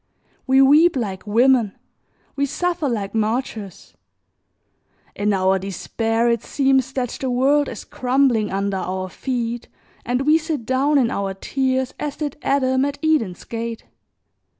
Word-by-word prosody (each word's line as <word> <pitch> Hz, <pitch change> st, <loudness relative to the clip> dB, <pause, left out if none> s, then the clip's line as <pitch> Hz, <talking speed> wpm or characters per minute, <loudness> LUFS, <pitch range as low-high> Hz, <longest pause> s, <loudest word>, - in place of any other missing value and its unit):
We 265 Hz, +1 st, +5 dB
weep 305 Hz, +5 st, +5 dB
like 200 Hz, -5 st, -4 dB
women, 235 Hz, -1 st, +3 dB, 0.6 s
we 280 Hz, 0 st, 0 dB
suffer 350 Hz, -1 st, -1 dB
like 205 Hz, -5 st, -3 dB
martyrs; 220 Hz, -3 st, -3 dB, 1.2 s
in 205 Hz, +1 st, 0 dB
our 190 Hz, -1 st, +2 dB
despair 225 Hz, +5 st, -1 dB
it 235 Hz, -2 st, +1 dB
seems 265 Hz, -2 st, +1 dB
that 255 Hz, -3 st, -1 dB
the 265 Hz, -, -1 dB
world 275 Hz, +4 st, +2 dB
is -, -, -8 dB
crumbling 250 Hz, -4 st, +1 dB
under 195 Hz, 0 st, -1 dB
our 185 Hz, 0 st, -3 dB
feet 240 Hz, +1 st, -3 dB, 0.4 s
and 245 Hz, +2 st, -1 dB
we 305 Hz, +3 st, +4 dB
sit 310 Hz, -7 st, -4 dB
down 270 Hz, +4 st, +2 dB
in 245 Hz, -4 st, +2 dB
our 195 Hz, -1 st, -2 dB
tears 260 Hz, +4 st, -1 dB
as 295 Hz, -2 st, -3 dB
did 300 Hz, -2 st, -4 dB
Adam 260 Hz, -1 st, +1 dB
at 285 Hz, 0 st, -2 dB
Eden's 275 Hz, -, +1 dB
gate. 230 Hz, 0 st, -5 dB
250 Hz, 140 wpm, -21 LUFS, 210-275 Hz, 1.2 s, We